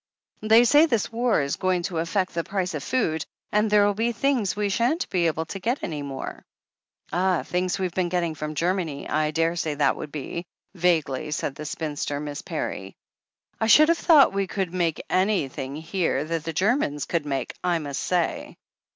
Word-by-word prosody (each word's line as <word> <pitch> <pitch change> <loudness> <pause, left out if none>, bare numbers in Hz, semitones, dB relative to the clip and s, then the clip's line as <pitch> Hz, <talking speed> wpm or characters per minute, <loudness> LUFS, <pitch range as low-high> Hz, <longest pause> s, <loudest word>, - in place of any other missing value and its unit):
"They 220 +2 +6
say 295 +6 +6
this 230 -7 0
war 235 -5 +2
is 140 - -2
going 185 -2 0
to 170 -3 -2
affect 185 +3 -1
the 170 -1 -1
price 185 -2 -2
of 150 - -3
food, 160 - 0 0.3
and 210 +1 +2
there'll 205 -1 +4
be 225 +4 0
things 235 -4 +1
we 205 0 0
shan't 240 - 0
be 175 -2 +2
able 160 0 -1
to 195 - -6
get 240 +8 -1
any 155 -4 -3
more/' 135 -2 -6 0.4
« - - -27
*Ah, 180 0 +1
things 180 +1 -1
we've 185 -3 -2
been 180 -1 0
getting 170 -2 0
from 155 0 -5
Germany, 170 -3 -1
I 155 +1 +1
daresay 165 -1 0
that 145 -1 +2
would 150 - -7
be," 160 +4 -5 0.3
vaguely 160 -5 +1
said 150 -2 -2
the 150 +2 -8
spinster. 145 -2 -3
Miss 145 -1 -5
Parry. - - -5 0.6
"I 220 - +1
should 305 +7 +7
have 335 - +4
thought 300 - +6
we 195 -1 0
could 185 -2 -3
make 170 -4 -1
anything 160 -9 0
here 160 -2 -1
that 165 0 -3
the 165 - -2
Germans 180 - +1
could 165 -4 -2
make, 135 -3 -2
I 175 -1 +2
must 145 -3 -4
say." 180 -2 -1
175 Hz, 190 wpm, -25 LUFS, 155-205 Hz, 0.6 s, should